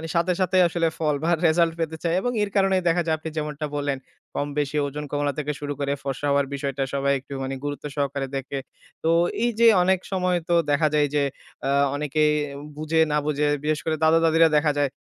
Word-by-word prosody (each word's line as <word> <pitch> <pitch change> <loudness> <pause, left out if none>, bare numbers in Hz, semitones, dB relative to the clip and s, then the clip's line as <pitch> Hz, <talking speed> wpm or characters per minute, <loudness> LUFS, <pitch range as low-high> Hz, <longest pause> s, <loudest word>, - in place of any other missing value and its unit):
সাথে, 170 +2 +2
সাথে 185 +1 +2
আসলে 165 0 0
ফল 150 -2 +1
বা 170 - +1 0.2
রেসাল্ট 165 +1 +3
পেতে 160 -1 -2
চায় 170 0 +1
এবং 245 - -1
এর 205 - -2
কারণেই 195 -2 +3
দেখা 175 +1 +2
যায় 160 - +2
আপনি 160 +1 -6
যেমনটা 150 0 -3
বললেন, 145 -1 -1 0.4
কম-বেশি 145 0 -2
ওজন 150 +2 -5
কমানো 145 0 0
থেকে 150 0 -2
শুরু 145 0 -3
করে, 140 0 -1
ফর্সা 140 +1 -3
হওয়ার 140 0 +2
বিষয়টা 140 -1 -2
সবাই 140 0 +1
একটু 135 +2 -11
মানে 135 +1 -3
গুরুত্ব 145 +1 -4
সহকারে 140 -1 -1
দেখে। 135 +1 -4 0.4
তো 165 - +2 0.3
এই 240 - +3
যে 235 - +7 0.2
অনেক 185 0 +3
সময় 180 -1 +1
তো 170 - +4 0.2
দেখা 155 +2 +3
যায় 150 -1 +4
এই - - -13
যে, 145 - +3 0.4
আ - - 0 0.3
অনেকেই 150 +1 +1 0.5
বুঝে 155 +1 0
না 150 - +2
বুঝে 150 0 +1 0.2
বিশেষ 155 0 0
করে, 160 -1 +1
দাদা-দাদিরা 165 0 +5
দেখা 150 0 +2
যায়, 145 - +2
150 Hz, 205 wpm, -24 LUFS, 145-165 Hz, 0.5 s, যে